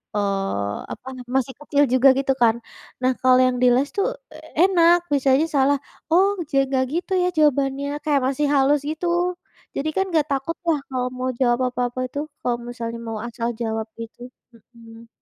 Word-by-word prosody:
Eee, 195 Hz, -, -1 dB, 0.2 s
apa 260 Hz, -, -13 dB
nama 250 Hz, -, -8 dB
masih 265 Hz, 0 st, -1 dB
kecil 290 Hz, -1 st, +1 dB
juga 260 Hz, +2 st, +5 dB
gitu 270 Hz, 0 st, +1 dB
kan. 230 Hz, -2 st, +4 dB, 0.5 s
Nah, 255 Hz, 0 st, +2 dB
kalau 255 Hz, 0 st, +5 dB
yang 255 Hz, -, +1 dB
di -, -, +6 dB
les 275 Hz, +3 st, +1 dB
tuh 400 Hz, -, +1 dB, 0.3 s
e -, -, -11 dB, 0.3 s
enak, 345 Hz, -1 st, +4 dB
misalnya 275 Hz, +2 st, +3 dB
salah, 280 Hz, 0 st, +3 dB, 0.3 s
"Oh, 390 Hz, +4 st, +4 dB, 0.2 s
ja 275 Hz, 0 st, +3 dB
enggak 260 Hz, -1 st, +1 dB
gitu 360 Hz, +3 st, -2 dB
ya 360 Hz, -, +2 dB
jawabannya," 280 Hz, 0 st, +1 dB
kayak 295 Hz, -2 st, +2 dB
masih 285 Hz, +2 st, 0 dB
halus, 280 Hz, +1 st, +3 dB
gitu. 350 Hz, +3 st, -1 dB, 0.4 s
Jadi 300 Hz, +3 st, -1 dB
kan 385 Hz, 0 st, +1 dB
enggak 310 Hz, -3 st, +2 dB
takut 275 Hz, +5 st, -2 dB
lah 310 Hz, -3 st, +2 dB
kalau 250 Hz, -1 st, -1 dB
mau 255 Hz, 0 st, -2 dB
jawab 240 Hz, -1 st, +2 dB
apa-apa 250 Hz, 0 st, -2 dB
itu, 285 Hz, -, -4 dB, 0.2 s
kalau 240 Hz, -1 st, 0 dB
misalnya 230 Hz, -1 st, -5 dB
mau 220 Hz, -1 st, -4 dB
asal 235 Hz, 0 st, -3 dB
jawab 220 Hz, -1 st, -2 dB, 0.2 s
itu. 240 Hz, +2 st, -11 dB, 0.5 s
Mhm. 230 Hz, 0 st, -14 dB
270 Hz, 175 wpm, -22 LUFS, 240-295 Hz, 0.5 s, di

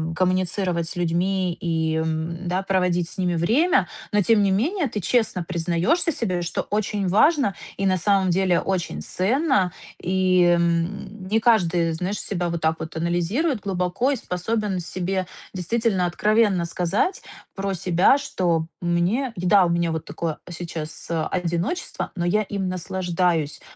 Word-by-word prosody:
коммуницировать 185 Hz, -1 st, 0 dB
с -, -, -7 dB
людьми 180 Hz, +2 st, 0 dB
и, 160 Hz, -2 st, -1 dB
м, 160 Hz, +2 st, -2 dB
да, 185 Hz, +2 st, -1 dB
проводить 180 Hz, -3 st, +1 dB
с -, -, -9 dB
ними 180 Hz, -2 st, 0 dB
время. 265 Hz, -, +2 dB, 0.2 s
Но 210 Hz, -, +4 dB
тем 210 Hz, +1 st, +4 dB
не 195 Hz, -, +2 dB
менее, 290 Hz, -, +1 dB
ты 210 Hz, -2 st, -4 dB
честно 185 Hz, -2 st, +1 dB
признаешься 180 Hz, -, +1 dB
себе, 185 Hz, -9 st, -1 dB
что 170 Hz, -, -2 dB
очень 205 Hz, -2 st, -1 dB
важно 260 Hz, -, +3 dB, 0.2 s
и 195 Hz, -, -2 dB
на 185 Hz, -1 st, +3 dB
самом 190 Hz, +1 st, +2 dB
деле 180 Hz, -1 st, +2 dB
очень 175 Hz, -, -2 dB
ценно 200 Hz, -, +1 dB, 0.3 s
И, 185 Hz, 0 st, +2 dB, 0.2 s
м, 175 Hz, +4 st, -2 dB
не 220 Hz, +3 st, +1 dB
каждый, 175 Hz, -8 st, +3 dB
знаешь, 180 Hz, +5 st, -3 dB
себя 175 Hz, -3 st, -1 dB
вот 170 Hz, -1 st, -3 dB
так 160 Hz, 0 st, +1 dB
вот 160 Hz, 0 st, -7 dB
анализирует 175 Hz, -, 0 dB
глубоко 195 Hz, +6 st, 0 dB
и -, -, +1 dB
способен 210 Hz, -1 st, -2 dB
себе 185 Hz, +2 st, -2 dB, 0.3 s
действительно 190 Hz, +1 st, 0 dB
откровенно 205 Hz, +1 st, +2 dB
сказать 180 Hz, -, -1 dB, 0.3 s
про 195 Hz, 0 st, -2 dB
себя, 180 Hz, -, +3 dB
что, 175 Hz, -, -1 dB
мне 180 Hz, +9 st, 0 dB
да, 185 Hz, +2 st, +4 dB
вот 175 Hz, -, +1 dB
у -, -, +2 dB
меня 170 Hz, -1 st, +1 dB
вот 160 Hz, -1 st, -4 dB
такое 160 Hz, +1 st, -4 dB
сейчас 165 Hz, -2 st, -6 dB
одиночество, 170 Hz, -, -2 dB
но 175 Hz, -2 st, -2 dB
я 210 Hz, +5 st, +2 dB
им 195 Hz, -1 st, -3 dB
наслаждаюсь! 180 Hz, -3 st, -1 dB
185 Hz, 150 wpm, -23 LUFS, 170-205 Hz, 0.3 s, Но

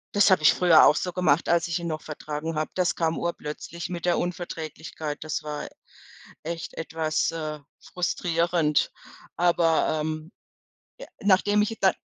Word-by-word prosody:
Das 205 Hz, 0 st, +5 dB
habe 185 Hz, -, +5 dB
ich 155 Hz, -, +6 dB
früher 175 Hz, -3 st, +6 dB
auch 150 Hz, -, +6 dB
so 180 Hz, -, -2 dB
gemacht, 170 Hz, -4 st, +2 dB
als 170 Hz, 0 st, +3 dB
ich 170 Hz, -, -1 dB
ihn 170 Hz, -1 st, -4 dB
noch 155 Hz, -1 st, -3 dB
vertragen 150 Hz, +1 st, -5 dB
habe. 155 Hz, 0 st, -2 dB
Das 175 Hz, -6 st, +1 dB
kam 165 Hz, -1 st, 0 dB
urplötzlich 170 Hz, +1 st, -5 dB
mit 175 Hz, -1 st, -5 dB
der 175 Hz, -, +2 dB
Unverträglichkeit. 160 Hz, -3 st, -5 dB
Das 155 Hz, -, -3 dB
war 150 Hz, -1 st, -5 dB, 0.7 s
echt 165 Hz, +1 st, -5 dB
etwas, 160 Hz, -1 st, -1 dB
äh, 155 Hz, -2 st, -4 dB, 0.2 s
frustrierend. 170 Hz, -3 st, 0 dB, 0.4 s
Aber, 165 Hz, -2 st, +2 dB
ähm, 155 Hz, +2 st, -4 dB, 0.7 s
äh, -, -, -9 dB
nachdem 205 Hz, +1 st, +3 dB
ich 220 Hz, +2 st, 0 dB
da 190 Hz, -, +4 dB
165 Hz, 155 wpm, -26 LUFS, 155-175 Hz, 0.7 s, ich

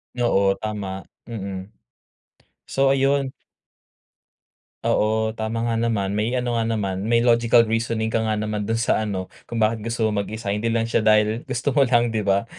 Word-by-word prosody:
Oo, 100 Hz, -5 st, +2 dB
tama. 100 Hz, -3 st, -4 dB, 0.2 s
Mm. 100 Hz, -5 st, -6 dB, 1.0 s
So, 135 Hz, 0 st, +1 dB
ayun 135 Hz, 0 st, +2 dB, 1.5 s
Oo, 110 Hz, +1 st, +1 dB
tama 115 Hz, +1 st, -3 dB
nga 115 Hz, -, 0 dB
naman. 115 Hz, -4 st, 0 dB
May 110 Hz, +4 st, 0 dB
ano 125 Hz, -1 st, -1 dB
nga 115 Hz, -, +1 dB
naman, 105 Hz, -4 st, -1 dB
may 115 Hz, 0 st, +3 dB
logical 115 Hz, 0 st, +5 dB
reasoning 115 Hz, 0 st, -1 dB
ka 115 Hz, -, +2 dB
nga 110 Hz, -1 st, 0 dB
naman 105 Hz, 0 st, -2 dB
do'n 110 Hz, +2 st, -1 dB
sa 115 Hz, -1 st, +1 dB
ano, 100 Hz, -4 st, -3 dB, 0.2 s
kung 120 Hz, -, -4 dB
bakit 110 Hz, 0 st, +1 dB
gusto 115 Hz, 0 st, -1 dB
mong 105 Hz, -2 st, +1 dB
mag-isa, 105 Hz, 0 st, -4 dB
hindi 105 Hz, +3 st, -1 dB
lang 115 Hz, 0 st, +1 dB
siya 115 Hz, 0 st, +1 dB
dahil 110 Hz, +1 st, +3 dB
gusto 130 Hz, +2 st, -1 dB
mo 140 Hz, -, +4 dB
lang, 120 Hz, -3 st, +3 dB
'di 110 Hz, -, 0 dB
ba. 100 Hz, +1 st, +1 dB
110 Hz, 170 wpm, -23 LUFS, 105-115 Hz, 1.5 s, logical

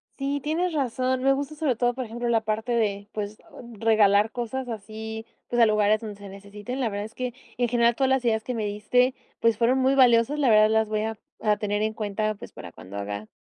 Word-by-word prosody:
Sí, 280 Hz, +1 st, -2 dB
tienes 330 Hz, +4 st, -1 dB
razón. 255 Hz, -2 st, 0 dB
Me 270 Hz, +1 st, +4 dB
gusta 285 Hz, +2 st, -3 dB
sobre 295 Hz, -5 st, 0 dB
todo, 245 Hz, +1 st, +1 dB
por 255 Hz, +1 st, -4 dB
ejemplo, 240 Hz, +2 st, -4 dB
la 230 Hz, -1 st, +2 dB
parte 220 Hz, +2 st, -2 dB
de, 205 Hz, -4 st, 0 dB
pues 210 Hz, 0 st, -5 dB
o 285 Hz, -, -11 dB
regalar 215 Hz, -1 st, +4 dB
cosas 245 Hz, +2 st, -4 dB
así, 220 Hz, 0 st, -7 dB, 0.2 s
pues 240 Hz, 0 st, +1 dB
a 230 Hz, -, +7 dB
lugares 215 Hz, 0 st, +3 dB
donde 215 Hz, -2 st, -6 dB
se 200 Hz, 0 st, -11 dB
necesiten. 205 Hz, +6 st, -7 dB
La 245 Hz, -4 st, 0 dB
verdad 205 Hz, 0 st, -4 dB
es 220 Hz, -, -11 dB
que, 250 Hz, 0 st, -4 dB, 0.2 s
en 245 Hz, 0 st, +1 dB
general, 235 Hz, 0 st, +3 dB
todas 265 Hz, 0 st, +1 dB
las 265 Hz, -2 st, +1 dB
ideas 220 Hz, -2 st, +1 dB
que 250 Hz, -, -4 dB
me 220 Hz, -2 st, -2 dB
diste, 215 Hz, +5 st, +1 dB, 0.3 s
pues, 230 Hz, -2 st, +2 dB
fueron 245 Hz, +2 st, +3 dB
muy 265 Hz, +1 st, +3 dB
valiosas, 255 Hz, +1 st, +4 dB
la 275 Hz, -4 st, +3 dB
verdad, 215 Hz, -1 st, +6 dB
las 220 Hz, 0 st, +2 dB
voy 215 Hz, 0 st, 0 dB
a 220 Hz, 0 st, -3 dB, 0.2 s
a 210 Hz, -1 st, +2 dB
tener 205 Hz, 0 st, -1 dB
en 220 Hz, 0 st, -1 dB
cuenta, 215 Hz, 0 st, -2 dB
pues, 205 Hz, -, -11 dB
para 85 Hz, -, -10 dB
cuando 95 Hz, +4 st, -10 dB
haga 100 Hz, +1 st, -5 dB
225 Hz, 235 wpm, -25 LUFS, 210-250 Hz, 0.3 s, a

